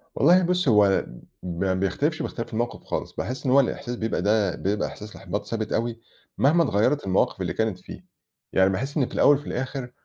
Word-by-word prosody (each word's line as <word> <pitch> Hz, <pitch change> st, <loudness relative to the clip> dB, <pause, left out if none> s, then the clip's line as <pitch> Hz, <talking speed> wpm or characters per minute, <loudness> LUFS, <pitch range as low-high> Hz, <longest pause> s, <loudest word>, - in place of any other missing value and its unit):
والله 175 Hz, +5 st, +5 dB
بُصّي، 180 Hz, -4 st, +1 dB
هو 105 Hz, -3 st, +4 dB, 0.4 s
ما 90 Hz, +2 st, -1 dB
بيختلفش، 120 Hz, -, -1 dB
باختلاف 115 Hz, -1 st, -5 dB
الموقف 120 Hz, +2 st, -3 dB
خالص. -, -, -4 dB
باحس 130 Hz, +3 st, -5 dB
إن 125 Hz, -, +2 dB
هو 140 Hz, -, +6 dB
الإحساس 125 Hz, -1 st, -1 dB
بيبقى 110 Hz, -5 st, -2 dB
ده 100 Hz, 0 st, 0 dB
إحساس 105 Hz, 0 st, -10 dB
إحباط 100 Hz, +2 st, -5 dB
ثابت 110 Hz, 0 st, -3 dB
أوي، 115 Hz, 0 st, -1 dB, 0.4 s
مهما 160 Hz, +5 st, +4 dB
اتغيّرت 135 Hz, +1 st, +1 dB
المواقف 95 Hz, -1 st, +1 dB
اللي -, -, -2 dB
كانت 110 Hz, -5 st, -1 dB
فيه. -, -, -11 dB, 0.5 s
يعني 95 Hz, 0 st, +4 dB
باحس 135 Hz, +11 st, -3 dB
إن 135 Hz, -, +3 dB
في -, -, -10 dB
الأوّل 145 Hz, -1 st, +5 dB
وفي 145 Hz, -, -11 dB
الآخر 130 Hz, -1 st, -4 dB
115 Hz, 185 wpm, -25 LUFS, 100-140 Hz, 0.5 s, هو